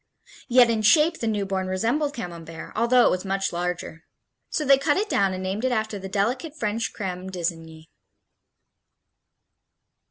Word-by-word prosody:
Yet 245 -1 +5
in 220 -1 0
shape 310 +9 +4
the 230 - -2
newborn 195 -3 -1
resembled 235 +11 0
Camembert, 165 -7 -8
although 235 +2 +4
it - - +4
was 185 - -1
much 195 -1 -1
larger. 175 -2 -4 0.5
So 305 - -1
they 275 0 +6
cut 290 +1 +1
it 420 +2 0
down 195 -1 +2
and 185 0 -5
named 195 +4 -3
it 260 - +1
after 220 -3 -1
the 190 0 -7
delicate 250 - -1
French 220 -1 -2
Creme 185 -2 -5
d'lsigny. 165 -3 -5
205 Hz, 155 wpm, -24 LUFS, 185-245 Hz, 0.5 s, they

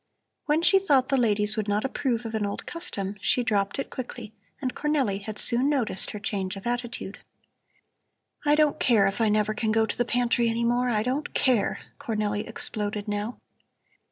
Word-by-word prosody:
When 310 +2 +2
she 390 +2 +6
thought 280 -9 +2
the 275 - +3
ladies 215 -4 +2
would 215 -2 -2
not 205 +3 0
approve 245 -3 -1
of 225 - -5
an 220 -1 -1
old 200 0 -3
custom, 205 - -3
she 250 - +2
dropped 200 -1 0
it 275 - -4
quickly, 240 -3 -7 0.3
and 255 -3 -2
Cornelli 275 -10 0
had 210 +1 -6
soon 250 +4 +4
noticed 250 -10 0
her 210 - -6
change 195 -3 -3
of 195 - -9
attitude. 240 0 -3 1.2
"I 295 0 +4
don't 300 -1 +2
care 225 -7 +4
if 195 +3 -1
I 220 - +3
never 215 0 +1
can 220 0 -1
go 220 0 +3
to 220 - -3
the 245 - +1
pantry 240 0 +1
any 230 +1 -1
more, 245 +1 +2
I 215 -3 +1
don't 265 +5 -2
care," 250 -6 +2 0.2
Cornelli 215 -6 -2
exploded 210 -1 -3
now. 210 +3 -3
230 Hz, 185 wpm, -26 LUFS, 210-255 Hz, 1.2 s, she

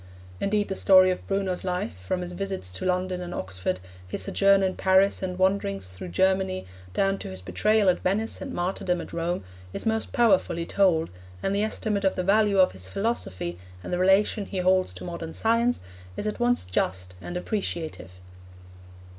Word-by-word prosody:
Indeed 205 +1 +1
the 195 - -2
story 185 -1 +6
of 180 - -5
Bruno's 195 -2 -1
life, 180 - -2
from 95 - -3
his 180 0 -5
visit 195 +1 -4
to 90 - -5
London 185 0 0
and 175 0 -5
Oxford, 95 -1 -3 0.3
his - - -2
sojourn 195 0 +4
in 185 -1 0
Paris 190 +1 +3
and 180 -1 -3
wanderings 185 - 0
through 90 0 -8
Germany, 190 - +1 0.3
down 195 0 +1
to - - -6
his 95 0 -6
betrayal 195 - +2
at 180 -1 +4
Venice 210 +4 -1
and 275 - -5
martyrdom 180 -2 -1
at - - -8
Rome, 170 - -2 0.3
is - - -5
most 220 0 0
powerfully 190 -7 +2
told, 170 - +2 0.3
and 195 - 0
the 200 - +1
estimate 215 -1 -1
of 190 - +2
the 185 - -1
value 205 +1 +3
of 185 -1 +5
his 95 0 -6
philosophy 95 - -3 0.2
and - - -5
the 180 - 0
relation 195 +2 +3
he 195 - -5
holds 185 0 +3
to - - -9
modern 170 -2 -6
science, 230 +2 +2 0.4
is - - -3
at 210 +2 -2
once 245 - +2
just 90 0 -2
and 175 - -5
appreciative. 170 - -3
185 Hz, 180 wpm, -26 LUFS, 170-200 Hz, 0.4 s, story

